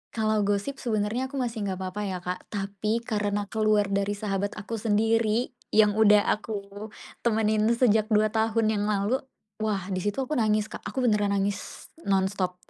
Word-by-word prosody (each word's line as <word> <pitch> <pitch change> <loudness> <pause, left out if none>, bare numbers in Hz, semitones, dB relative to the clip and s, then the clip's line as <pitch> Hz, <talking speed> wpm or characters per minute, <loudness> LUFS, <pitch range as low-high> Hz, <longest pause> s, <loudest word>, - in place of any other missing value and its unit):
Kalau 215 -1 +1
gosip, 205 +7 -1
sebenarnya 225 +1 -1
aku 275 - -10
masih 230 -6 -2
nggak 190 -1 -2
apa-apa 190 +2 -4
ya, 185 -1 -3
Kak. 180 +1 -3
Tapi, 205 +3 -2
karena 205 -2 -1
keluar 215 -2 +2
dari 200 +1 0
sahabat 200 -1 -2
aku 215 +2 -5
sendiri, 225 +2 +1 0.2
yang 215 -1 +5
udah 210 -1 +6
aku 210 -1 -3 0.6
temenin 215 -2 +2
sejak 220 -3 +3
2 215 -1 +3
tahun 220 0 +1
yang 205 -2 0
lalu, 210 +5 +1 0.4
wah! 210 -3 -1
Di 185 - -1
situ 205 +4 -2
aku 265 - -4
nangis, 215 -1 +1
Kak. - - -6
Aku 250 +5 -2
beneran 205 -3 +2
nangis, 200 0 -3 0.2
non-stop. 190 -1 +1
210 Hz, 165 wpm, -27 LUFS, 200-220 Hz, 0.6 s, udah